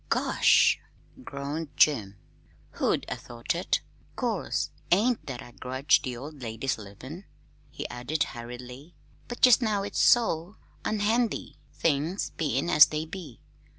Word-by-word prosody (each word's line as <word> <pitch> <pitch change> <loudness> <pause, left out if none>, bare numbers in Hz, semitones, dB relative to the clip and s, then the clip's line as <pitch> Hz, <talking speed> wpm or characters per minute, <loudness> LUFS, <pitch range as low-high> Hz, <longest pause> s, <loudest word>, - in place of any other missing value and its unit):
"Gosh!" - - +4 0.4
groaned 145 - -5
Jim. 105 -10 +3 0.6
"Who'd - - +1
'a' - - -3
thought 120 -1 -4
it? - - 0 0.3
'Course - - -1 0.2
't - - +6
ain't 235 +3 0
that 130 -3 -5
I 120 - -13
grudge 130 +3 +1
the 125 -3 -4
old 145 +2 -9
lady's 115 +2 -3
livin'," 130 - -10 0.4
he - - -6
added 140 +5 -1
hurriedly, 125 +5 -9 0.3
"but 240 - -7
jest 250 -2 +7
now 210 -4 0
it's 205 - -1
so 200 -5 +3 0.3
unhandy, 215 - 0
things 160 +5 -1
bein' 145 -2 -1
as 150 -3 +8
they 155 +1 -3
be. 160 -7 -9
150 Hz, 135 wpm, -27 LUFS, 125-190 Hz, 0.6 s, as